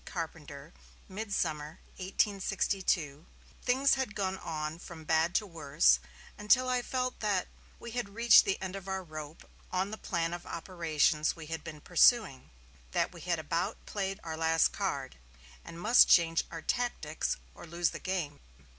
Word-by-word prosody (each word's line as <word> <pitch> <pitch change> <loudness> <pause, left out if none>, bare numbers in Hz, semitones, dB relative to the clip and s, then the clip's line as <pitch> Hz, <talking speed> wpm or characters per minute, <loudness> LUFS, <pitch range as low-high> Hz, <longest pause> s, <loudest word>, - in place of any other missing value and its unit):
Carpenter, 160 -3 -7 0.3
"midsummer, 170 -7 -3 0.2
1862. 190 -5 0 0.4
Things 265 +2 +3
had 260 -6 -2
gone 190 -1 -2
on 155 0 -4
from 165 -2 -10
bad 160 +3 +1
to 215 - +2
worse, 140 - +3 0.4
until 255 +5 +4
I 250 -1 +1
felt 255 0 -2
that 200 -4 0 0.3
we 235 - -8
had 245 -3 -3
reached 235 0 +7
the 195 - -1
end 190 0 -4
of 195 -1 -8
our 190 0 -3
rope 155 -2 -9 0.2
on 190 +2 -1
the 220 - -6
plan 170 -2 -1
of 175 - -7
operations 160 -3 0
we 165 -2 -9
had 165 - -5
been 150 -2 -9
pursuing; 180 - +3 0.4
that - - +1
we - - -11
had 175 -1 0
about 165 +6 -2
played 195 -1 -3
our 160 -1 -4
last 160 0 +3
card, - - -3 0.5
and 170 0 -10
must 220 +7 +6
change 165 -1 +4
our 165 -1 -7
tactics, 235 -11 -1 0.2
or - - -12
lose 170 0 0
the - - -7
game. 175 -6 -3
175 Hz, 155 wpm, -31 LUFS, 160-200 Hz, 0.5 s, reached